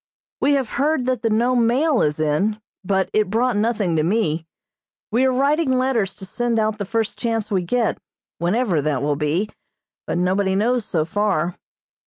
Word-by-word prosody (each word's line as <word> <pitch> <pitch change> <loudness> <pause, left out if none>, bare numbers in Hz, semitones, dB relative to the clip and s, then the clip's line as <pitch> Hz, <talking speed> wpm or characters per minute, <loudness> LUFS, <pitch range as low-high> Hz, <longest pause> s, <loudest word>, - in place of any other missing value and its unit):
We 285 - +3
have 270 -3 +1
heard 295 -3 +1
that 255 -3 0
the 230 - +1
Nome 235 +2 +2
mail 270 +3 +2
is 150 0 0
in, 155 +8 0 0.2
but 190 -1 +1
it 215 -2 +2
brought 235 +3 +1
nothing 210 -5 0
to 155 - +2
me. 165 -4 0 0.6
We 245 +4 +3
are 260 - +3
writing 275 +1 +2
letters 240 -7 0
to 190 - -8
send 235 +4 -1
out 215 -1 0
the 205 - -2
first 225 +2 -2
chance 225 -2 -2
we 190 -2 +2
get, 230 +6 0 0.4
whenever 180 -1 +1
that 140 -2 -1
will 145 0 +1
be, 155 +8 -1 0.6
but - - -1
nobody 190 +2 +1
knows 235 +3 +1
so 160 -6 0
far. 180 -2 0
215 Hz, 180 wpm, -21 LUFS, 180-245 Hz, 0.6 s, We